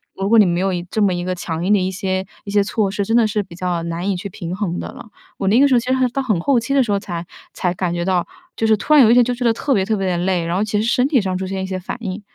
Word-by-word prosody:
如 195 +1 -2
果 230 -1 +6
你 205 - +7
没 175 +1 0
有 195 0 +1
一 175 -1 -3
这 215 - -1
么 195 -3 +3
一 175 0 -3
个 185 0 -2
强 170 0 -4
硬 205 - +3
的 205 - +4
一 185 +1 -1
些 190 -1 -2 0.2
一 200 - -6
些 205 -1 +3
措 210 -1 0
施， 200 +1 -2
真 225 +4 +1
的 225 -2 +4
是 210 0 -1
比 170 -3 -13
较 175 -2 -2
难 170 +3 -3
以 195 - 0
去 195 +3 -6
平 180 -2 -6
衡 190 -4 -3
的 - - -5
了。 225 - -12 0.3
我 195 - -2
那 230 +5 +4
个 285 - +6
时 265 - +1
候， - - +5
其 250 - -6
实 - - +3
还 260 -1 +2
到 275 +3 -2
很 210 -9 0
后 255 +6 +2
期 235 +4 -3
的 275 - +4
时 215 - -3
候， 200 - +1
才 175 -4 -6 0.3
才 180 -2 -1
感 180 -1 -2
觉 175 0 -2
到， 185 -2 +1 0.3
就 225 - -1
是 220 -1 +4
突 305 - 0
然 285 -4 +8
有 225 - +5
一 - - +6
天， 245 - +6
就 250 - -1
觉 245 +1 -5
得 230 - +4
特 270 +4 -1
别 195 -4 +2
特 215 +1 -1
别 195 -1 -1
地 175 -1 0
累， 180 -3 0
然 170 +1 -2
后 200 - +1
其 210 0 -1
实 225 - -1
身 250 +2 +2
体 270 -6 +3
上 190 -2 -2
出 190 - -4
现 190 +1 -4
了 190 - -2
一 - - -2
些 190 0 -4
反 185 - -6
应。 195 0 -5
195 Hz, 395 characters per minute, -19 LUFS, 180-225 Hz, 0.3 s, 然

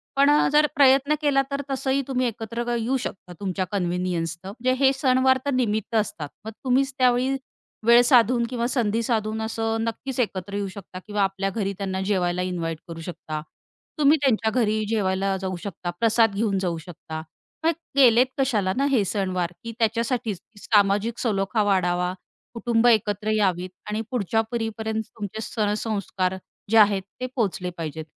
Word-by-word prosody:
पण 280 +1 +5
अ, 295 +1 +4
जर 300 0 +5
प्रयत्न 275 +1 +5
केला 285 -2 +3
तर 280 0 -1
तसंही 270 +1 0
तुम्ही 255 -2 0
एकत्र 230 +1 -4
येऊ 240 +4 0
शकता 190 -6 -7
तुमच्या 190 -1 -2
कन्व्हिनियन्सनं. 180 -2 -2
म्हणजे 255 +1 +2
हे 265 - +6
सणवार 260 -1 +3
तर 285 - +1
निमित्त 220 -3 0
असतात. 190 -9 -1 0.2
मग 220 - -5
तुम्हीच 270 +1 +2
त्यावेळी 255 +1 +3 0.5
वेळ 235 +1 +8
साधून 240 -1 +4
किंवा 240 -2 -1
संधी 230 -3 0
साधून 220 -1 -1
असं 225 0 -1
नक्कीच 240 +3 -4
एकत्र 200 -4 -2
येऊ 200 -1 -1
शकता 185 -1 -9
किंवा 205 -1 0
आपल्या 195 0 -1
घरी 200 -1 -2
त्यांना 190 -1 -3
जेवायला 180 -3 0
इन्व्हाइट 170 -3 -3
करू 165 -1 -7
शकता. 160 -3 -6 0.6
तुम्ही 295 +2 +5
त्यांच्या 225 -5 +2
घरी 215 0 +1
जेवायला 195 -2 0
जाऊ 190 -1 -3
शकता, 185 -3 -5
प्रसाद 225 -1 +3
घेऊन 205 -2 +1
जाऊ 175 -3 -1
शकता. 160 -1 -8 0.4
मग 325 - +4 0.2
केलेत 250 -3 +6
कशाला 215 -8 +1
ना 275 - +2
हे 245 -6 +3
सणवार? 185 -3 -1
की 230 - -5
त्याच्यासाठीच 230 -2 0
की 205 +2 -21
सामाजिक 205 +2 +2
सलोखा 205 -2 0
वाढावा, 180 -2 +1 0.4
कुटुंब 235 0 +2
एकत्र 210 -2 +2
यावीत 185 -3 +1 0.2
आणि 210 +1 -1
पुढच्या 225 -2 +1
पिढीपर्यंत 220 -1 -2
तुमचे 215 0 -5
सण-संस्कार 205 -4 -1 0.4
जे 225 - +5
आहेत 205 -2 +5 0.2
ते - - 0
पोहोचले 190 -6 -1
पाहिजेत. 160 -1 -5
215 Hz, 160 wpm, -24 LUFS, 190-240 Hz, 0.6 s, वेळ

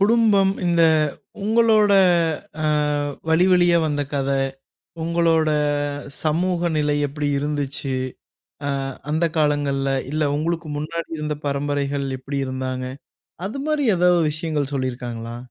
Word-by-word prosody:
குடும்பம் 205 -2 +4
இந்த 170 -1 +3 0.6
உங்களோட 220 -1 +4 0.7
அ - - +1 0.6
வழிவழியா 175 +1 +4
வந்த 145 -1 0
கத, 140 -1 0 0.7
உங்களோட 165 -1 +2 0.7
சமூக 175 +2 +1
நிலை 150 -1 +1
எப்பிடி 145 +1 -3
இருந்துச்சு, 145 -2 -3 0.7
அ - - -1 0.4
அந்த 160 +2 +2
காலங்கள்ல. 145 -2 +1 0.2
இல்ல 155 +1 0
உங்களுக்கு 165 +1 -2
முன்னாடி 165 +3 -4
இருந்த 150 -1 -2
பரம்பரைகள் 140 0 -1
எப்படி 140 +2 -4
இருந்தாங்க, 130 0 -3 0.6
அது 230 +8 -5
மாரி 300 -3 +1
ஏதாவது 175 -1 +4
விஷயங்கள் 150 -3 -2
சொல்லியிருக்காங்களா? 120 -3 -4
155 Hz, 105 wpm, -22 LUFS, 140-175 Hz, 0.7 s, குடும்பம்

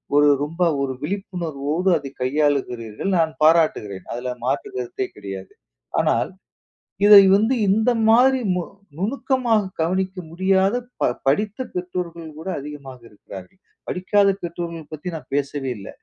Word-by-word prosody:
ஒரு 145 0 +6
ரொம்ப 165 +5 -4 0.2
ஒரு 135 -1 -1
விழிப்புணர்வோடு 170 -2 -2
அதை 140 -2 -7
கையாளுகிறீர்கள், 130 - -1
நான் 160 -1 +2
பாராட்டுகிறேன். 155 - +2
அதுல 125 +1 -3
மாற்று 135 - -1
கருத்தே 390 -1 -3
கிடையாது. 95 -1 -8 0.5
ஆனால், - - +1 0.8
இதை 205 -1 +10
வந்து 220 +5 +2
இந்த 220 +5 +3 0.2
மாதிரி 255 +4 +5
மு 180 - -1 0.4
நுணுக்கமாக 240 +1 +1 0.2
கவனிக்க 185 +3 -1
முடியாத 190 +4 +2 0.3
ப 125 - +3 0.2
படித்த 205 +9 +1 0.2
பெற்றோர்கள் 175 -2 -4
கூட, 175 - -7
அதிகமாக 140 -3 -9
இருக்கிறார்கள். 100 - -12 0.3
படிக்காத 200 +2 +2
பெற்றோர்கள் 170 -2 -6
பத்தி 155 +4 -6
நான் 155 - -12
பேசவே 140 -1 -2
இல்ல. 100 - -9
170 Hz, 125 wpm, -22 LUFS, 140-195 Hz, 0.8 s, இதை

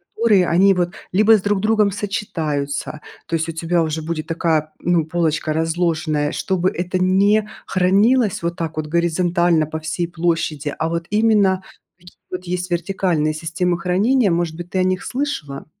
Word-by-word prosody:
которые 210 -5 +3
они 190 +4 +4
вот 175 -1 0 0.2
либо 215 +4 +5
с - - -5
друг 205 0 0
другом 215 -1 +2
сочетаются. 155 -8 -3 0.2
То 165 - -2
есть 160 0 -1
у - - -1
тебя 165 +2 0
уже 160 0 -2
будет 155 -1 -4
такая, 160 -2 0
м, 175 - +1
ну, 165 -3 +2
полочка 160 -1 -1
разложенная, 160 -2 0
чтобы 185 -1 0
это 180 +1 -2
не 200 +3 +3 0.2
хранилось 200 +3 +2
вот 170 0 -1
так 160 -2 -5
вот 155 -1 -2
горизонтально 170 0 +1
по 155 +1 -5
всей 160 +2 -3
площади, 165 -4 -2
а 160 - -1
вот 170 0 -3
именно 210 -3 +3 0.3
такие 175 -1 -17 0.2
вот 185 0 -5
есть 180 0 -3
вертикальные 175 -3 0
системы 170 +3 -2
хранения. 200 +6 +2
Может 170 -1 -1
быть, 175 0 -8
ты 185 - -1
о - - +3
них 185 0 0
слышала? 245 - -4
175 Hz, 170 wpm, -20 LUFS, 160-190 Hz, 0.3 s, либо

